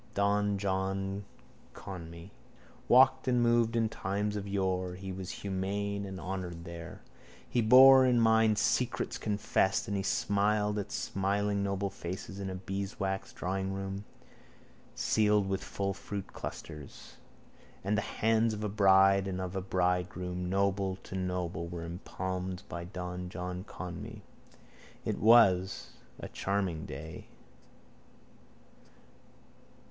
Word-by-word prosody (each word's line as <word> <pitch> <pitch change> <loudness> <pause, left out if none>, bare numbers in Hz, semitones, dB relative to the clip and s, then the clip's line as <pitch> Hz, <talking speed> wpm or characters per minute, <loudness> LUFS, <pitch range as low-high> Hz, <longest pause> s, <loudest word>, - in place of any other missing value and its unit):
Don 100 0 +2
John 95 0 -2 0.5
Conmee 85 0 -9 0.6
walked 130 +1 +5
and 125 -1 +3
moved 120 -1 +3
in 115 -1 +2
times 105 0 -2
of 100 -1 -4
yore. 95 -2 -1
He 95 +1 -6
was 95 0 -6
humane 100 +1 -3
and 95 -1 -6
honoured 90 -1 -5
there. 85 -1 -9 0.4
He 120 - +1
bore 130 +3 +9
in 125 -1 +4
mind 110 -1 +4
secrets 125 +3 0
confessed 100 -2 +1
and 100 - -2
he 100 - 0
smiled 105 0 +1
at 105 0 -5
smiling 100 +1 0
noble 100 0 -1
faces 95 +2 -6
in 95 -1 -3
a 95 - -4
beeswaxed 95 +1 -4
drawingroom, 95 +1 -3 0.9
ceiled 105 -2 +2
with 95 0 -2
full 100 -1 -2
fruit 100 0 -7
clusters. 75 -4 -8 0.7
And 100 +3 +1
the 105 - +1
hands 110 +1 +1
of 105 - -6
a 105 - -1
bride 95 -1 +5
and 95 -1 -3
of 95 0 -4
a 95 - -1
bridegroom, 90 -1 -1
noble 100 0 +1
to - - -10
noble, 90 -2 -2
were 85 -1 -6
impalmed 95 +2 -4
by 85 0 -6
Don 90 0 -5
John 90 0 -5
Conmee. 90 -4 -7 0.8
It - - -1
was 100 -5 +5 0.3
a - - -6
charming 95 -5 -2
day. 80 +4 -8
95 Hz, 125 wpm, -31 LUFS, 90-105 Hz, 0.9 s, bore